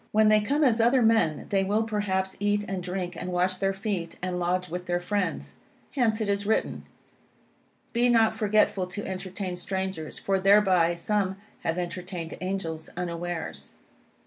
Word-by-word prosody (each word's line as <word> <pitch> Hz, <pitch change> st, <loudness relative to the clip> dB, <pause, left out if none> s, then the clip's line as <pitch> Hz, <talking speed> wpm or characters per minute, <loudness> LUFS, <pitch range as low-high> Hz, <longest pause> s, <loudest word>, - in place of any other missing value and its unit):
When 215 Hz, 0 st, +5 dB
they 215 Hz, 0 st, +5 dB
come 285 Hz, +8 st, +1 dB
as 235 Hz, -4 st, +4 dB
other 240 Hz, +2 st, +4 dB
men, 220 Hz, -9 st, +3 dB
they 195 Hz, -1 st, +2 dB
will 210 Hz, +3 st, +1 dB
perhaps 190 Hz, -3 st, -1 dB
eat 205 Hz, 0 st, +1 dB
and 190 Hz, -1 st, -3 dB
drink, 180 Hz, 0 st, -4 dB
and 180 Hz, +2 st, -5 dB
wash 180 Hz, +1 st, +1 dB
their 195 Hz, 0 st, +2 dB
feet; 195 Hz, -4 st, -3 dB
and 180 Hz, 0 st, -2 dB
lodge 180 Hz, +1 st, 0 dB
with 180 Hz, +1 st, -5 dB
their 175 Hz, 0 st, +1 dB
friends. 200 Hz, +1 st, -2 dB, 0.3 s
Hence, 235 Hz, -5 st, +1 dB
it 215 Hz, -, -1 dB
is 200 Hz, 0 st, 0 dB
written 220 Hz, -, 0 dB, 1.1 s
"Be 240 Hz, +1 st, +3 dB
not 225 Hz, -2 st, +4 dB
forgetful 210 Hz, -3 st, +2 dB
to 205 Hz, +3 st, -6 dB
entertain 185 Hz, 0 st, -4 dB
strangers: 190 Hz, -3 st, -4 dB
for 195 Hz, -1 st, 0 dB
thereby 190 Hz, -4 st, +4 dB
some 195 Hz, +2 st, 0 dB, 0.2 s
have 165 Hz, +1 st, -1 dB
entertained 175 Hz, -1 st, -4 dB
angels 170 Hz, -4 st, -3 dB
unawares." 170 Hz, -, -4 dB
190 Hz, 160 wpm, -27 LUFS, 180-210 Hz, 1.1 s, When